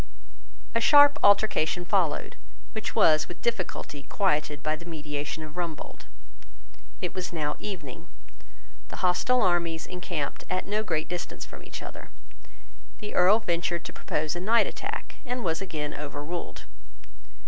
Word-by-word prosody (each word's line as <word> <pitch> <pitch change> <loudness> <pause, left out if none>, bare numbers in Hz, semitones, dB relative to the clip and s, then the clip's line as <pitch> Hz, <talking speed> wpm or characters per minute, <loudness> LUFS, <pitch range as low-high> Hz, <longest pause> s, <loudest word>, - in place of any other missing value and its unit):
A 230 - +2
sharp 290 +2 +8
altercation 200 -4 +4
followed, - - +1 0.4
which 220 -2 -4
was 155 0 +5
with 175 - -10
difficulty 185 -9 -2
quieted 150 -4 0
by 155 0 +1
the 170 - -11
mediation 150 -2 -4
of 155 -1 -9
Rumbold. 170 -3 -5 1.0
It 180 - -2
was 185 -1 -3
now 150 -3 -1
evening. 165 -11 -6 0.8
The - - -3
hostile 245 +8 +3
armies 170 -2 +1
encamped 175 -5 -4
at 185 - -1
no 210 +2 0
great 165 -7 -1
distance 175 0 -5
from - - -11
each - - -8
other. - - -9 0.9
The 210 - -7
Earl 185 +4 +6
ventured 170 -3 -1
to - - -6
propose 155 +1 -2
a - - -2
night 225 +6 +4
attack, - - -5
and 250 -2 -3
was 165 -1 0
again 155 -6 -3
overruled. 150 +4 -5
175 Hz, 140 wpm, -28 LUFS, 155-200 Hz, 1.0 s, sharp